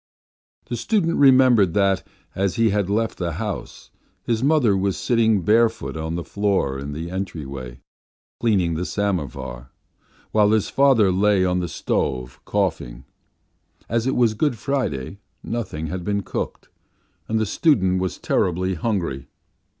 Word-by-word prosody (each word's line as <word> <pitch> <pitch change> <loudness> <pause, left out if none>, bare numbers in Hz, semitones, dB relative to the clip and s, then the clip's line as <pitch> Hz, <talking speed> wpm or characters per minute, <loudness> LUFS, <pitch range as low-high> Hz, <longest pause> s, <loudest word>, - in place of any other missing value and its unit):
The 120 - -4
student 180 - 0
remembered 130 -9 +5
that, 100 -2 +2 0.3
as 95 -1 -1
he 115 -1 +3
went 100 -2 0
out 110 +2 +1
from - - -7
the 85 -1 -2
house, 100 +3 -6 0.3
his 115 -1 -1
mother 135 -7 +3
was 95 0 0
sitting 110 -5 +2
barefoot 115 +2 +2
on 80 +1 -3
the 85 - -3
floor 95 -11 0
in 70 +1 -6
the 80 +3 -5
entry, 95 -5 -4 0.9
cleaning 95 -8 +2
the 85 +3 -2
samovar, 75 - -3 0.6
while 105 -1 +4
his 110 -2 +1
father 130 -8 +4
lay 95 0 +3
on 90 0 +1
the 90 - -2
stove 65 -4 -2
coughing; 80 -11 -2 0.8
as 115 +2 0
it 135 - +1
was 120 -3 +3
Good 125 +2 0
Friday 100 - -3 0.2
nothing 95 -9 -4
had 90 +3 -4
been 100 +1 -1
cooked, - - -5 0.6
and 110 0 0
the 110 - +1
student 95 - +2
was 95 -2 -2
terribly 90 +2 0
hungry. 85 - -2
100 Hz, 145 wpm, -22 LUFS, 85-115 Hz, 0.9 s, remembered